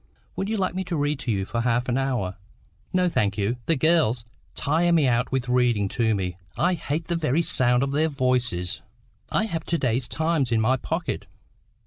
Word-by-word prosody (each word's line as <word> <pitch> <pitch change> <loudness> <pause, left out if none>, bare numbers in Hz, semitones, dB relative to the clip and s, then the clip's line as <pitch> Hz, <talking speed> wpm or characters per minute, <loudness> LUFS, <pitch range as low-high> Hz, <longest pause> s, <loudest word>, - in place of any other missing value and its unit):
Would 195 - -2
you 220 - 0
like 190 -3 0
me 190 +1 -2
to 175 -1 -3
read 145 -1 0
to 120 -3 -2
you 95 -2 0
for 115 +3 -2
half 120 +1 +1
an 120 - 0
hour?" 125 -9 -1 0.6
"No, 185 -1 +2
thank 105 - 0
you. 105 +4 0
The 165 - +3
girls 140 -6 +2 0.3
tire 165 +4 +2
me 160 -5 +4
out 125 0 +1
with 130 -1 -1
reading 125 -5 +2
to 110 -1 +1
me. 90 -2 -3 0.2
I 180 +1 +2
hate 160 -1 -3
the 170 - 0
very 160 0 +1
sound 125 -3 +2
of 135 - -1
their 155 +3 +2
voices." 125 - 0 0.5
"I 215 - +1
have 165 -7 -3
got - - -24
to 170 - +2
day's 125 -3 0
Times 160 -5 0
in 115 - +3
my 115 +4 +3
pocket." 165 +6 -3
130 Hz, 205 wpm, -25 LUFS, 120-165 Hz, 0.6 s, me